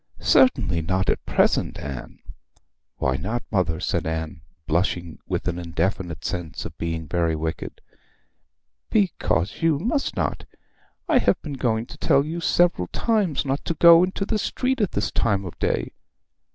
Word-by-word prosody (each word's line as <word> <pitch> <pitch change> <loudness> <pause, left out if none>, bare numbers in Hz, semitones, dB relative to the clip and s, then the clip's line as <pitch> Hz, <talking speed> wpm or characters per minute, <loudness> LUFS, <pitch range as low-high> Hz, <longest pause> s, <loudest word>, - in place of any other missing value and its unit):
'Certainly 90 - +3
not 95 +3 +1
at - - -2
present, - - +2
Anne.' 70 -3 -7 0.8
'Why 65 -1 0
not, 115 - -3
mother?' 90 -5 +1
said 85 -2 -1
Anne, 80 -1 -4 0.2
blushing 85 0 -1
with - - -2
an 90 0 -1
indefinite 85 0 -2
sense 85 -6 -4
of - - -7
being 80 -1 -3
very 85 0 0
wicked. 80 +1 -5 1.1
'Because 155 - 0
you 165 -3 +3
must 240 - -1
not. - - -2 0.6
I 315 -7 +4
have 190 - +2
been 150 - -5
going 115 -4 0
to - - -12
tell 140 +1 +3
you 165 +2 -4
several 170 - +2
times 205 - 0
not 135 +1 -1
to 170 - -1
go 170 +1 +8
into 190 +2 -1
the 215 0 -1
street 255 +3 -1
at 205 - 0
this 105 - -1
time 100 -4 0
of 90 - -9
day. - - 0
100 Hz, 155 wpm, -24 LUFS, -, 1.1 s, go